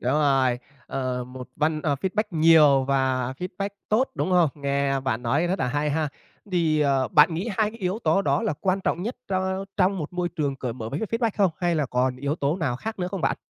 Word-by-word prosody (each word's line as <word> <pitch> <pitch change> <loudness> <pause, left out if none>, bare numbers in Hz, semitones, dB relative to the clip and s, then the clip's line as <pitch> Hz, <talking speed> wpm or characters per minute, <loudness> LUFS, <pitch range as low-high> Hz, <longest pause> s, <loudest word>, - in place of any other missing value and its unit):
đúng 125 - 0
rồi, 135 -4 +2 0.3
ờ, 130 -2 -3
một 125 0 -9
văn 155 0 +1
ờ, 145 - +1
feedback 195 +3 0
nhiều 155 -5 +5
và 130 -2 0
feedback 185 +2 -4 0.2
tốt, 245 +5 +2
đúng - - -1
hông? 175 -4 +4
Nghe 140 -1 0
bạn 130 -3 -2
nói 140 +8 +1
rất 190 +3 -1
là - - 0
hay 145 +3 0
ha. 155 +1 0 0.4
Thì, 160 -4 +2
ờ, 135 -3 +2
bạn 150 +3 +5
nghĩ 185 +8 -2
hai 215 -1 +2
cái 230 - -13
yếu 190 +1 -1
tố 170 -2 +2
đó 140 -1 +1
là - - 0
quan 190 0 +1
trọng 180 - -1
nhất 230 +6 -4
tro 190 0 -1
trong 195 0 +2
một 155 0 -5
môi 180 -1 -1
trường 145 -4 -2
cởi 125 -2 -4
mở 115 -2 -6
với 140 +6 -4
cái 220 - -1
feedback 230 0 +1
không, 195 -3 +3
hay 175 -2 +1
là 150 -3 0
còn 125 +1 0
yếu 140 +3 -2
tố 145 +1 0
nào 150 -9 -1
khác 220 - -6
nữa 180 -1 -1
không 195 0 -4
bạn? - - +1
155 Hz, 240 wpm, -25 LUFS, 135-185 Hz, 0.4 s, nhiều